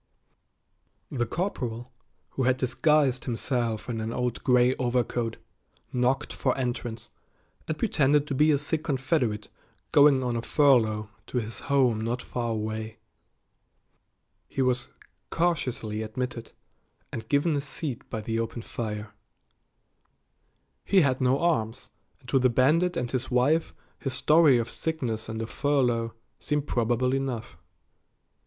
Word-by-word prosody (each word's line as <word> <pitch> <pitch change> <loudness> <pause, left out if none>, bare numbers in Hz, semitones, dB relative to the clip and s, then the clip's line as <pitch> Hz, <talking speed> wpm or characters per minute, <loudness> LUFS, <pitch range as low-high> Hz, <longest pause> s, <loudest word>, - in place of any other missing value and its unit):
The 120 -4 -1
corporal, 125 - -3 0.4
who - - -3
had 130 0 +3
disguised 135 0 +2
himself 120 -2 -1
in 115 -3 -3
an 110 +1 -3
old 125 0 -2
gray 125 0 +4
overcoat, 120 -2 -1 0.6
knocked 130 +3 +1
for 130 - 0
entrance, 120 -3 -3 0.6
and 155 - -2
pretended 150 -8 +2
to 150 - -3
be 150 +4 +4
a 150 - +4
sick 155 +2 -1
Confederate 130 -6 0 0.4
going 145 -2 +6
on 120 -1 -1
a 115 - -1
furlough 110 -7 +3 0.2
to - - -3
his 115 -1 -3
home 130 -6 +2
not 115 +2 -1
far 120 -2 -3
away. 110 0 -3 1.5
He 135 - -1
was 125 -1 0 0.4
cautiously 130 -10 -1
admitted 115 +2 -4 0.6
and 110 - -6
given 145 +2 +2
a 140 - 0
seat 140 -2 -4
by 110 - -4
the 115 +1 -2
open 115 0 -3
fire. 105 -3 -5 1.7
He 195 -2 +4
had 130 -4 +1
no 130 +1 +3
arms, 130 -8 -1 0.3
and 130 - -20
to 135 - +3
the 130 0 +4
bandit 160 +9 +3
and 125 -6 -2
his 130 -2 -2
wife 140 +6 +2 0.3
his 135 - -3
story 150 0 +5
of 115 -1 -1
sickness 120 -8 -3
and 110 0 -4
a - - -2
furlough 120 -4 0 0.2
seemed 150 -1 -1
probable 120 0 +1
enough. 125 -7 -3
125 Hz, 135 wpm, -27 LUFS, 115-140 Hz, 1.7 s, going